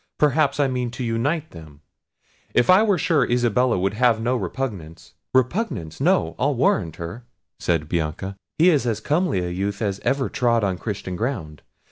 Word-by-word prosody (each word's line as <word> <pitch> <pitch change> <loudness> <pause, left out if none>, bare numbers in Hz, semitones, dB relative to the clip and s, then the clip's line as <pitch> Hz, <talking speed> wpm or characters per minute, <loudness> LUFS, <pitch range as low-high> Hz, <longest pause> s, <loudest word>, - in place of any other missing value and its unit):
perhaps 150 -1 +2
I 145 - +3
mean 125 -2 -2
to 130 - -3
unite 140 +8 -1
them—If 80 - -4
I 185 +3 +7
were 205 -4 +3
sure 155 -3 +2
Isabella 120 -1 +2
would 95 +2 0
have 115 0 +3
no 120 +3 0
repugnance." 95 -6 -5 0.2
"Repugnance! 130 - -1
no, 180 +6 +2
I'll 145 +2 +1
warrant 90 - +1
her," 85 +9 -7 0.4
said 80 -3 0
Bianca; 85 +4 -3 0.2
"he 175 +3 +6
is 140 -6 +1
as 110 -2 0
comely 150 - 0
a - - -3
youth 100 +2 -2
as 100 -2 -2
ever 135 +1 0
trod 115 -2 +1
on 95 -2 -1
Christian 95 -4 -4
ground. 90 - -4
120 Hz, 165 wpm, -23 LUFS, 95-140 Hz, 0.4 s, I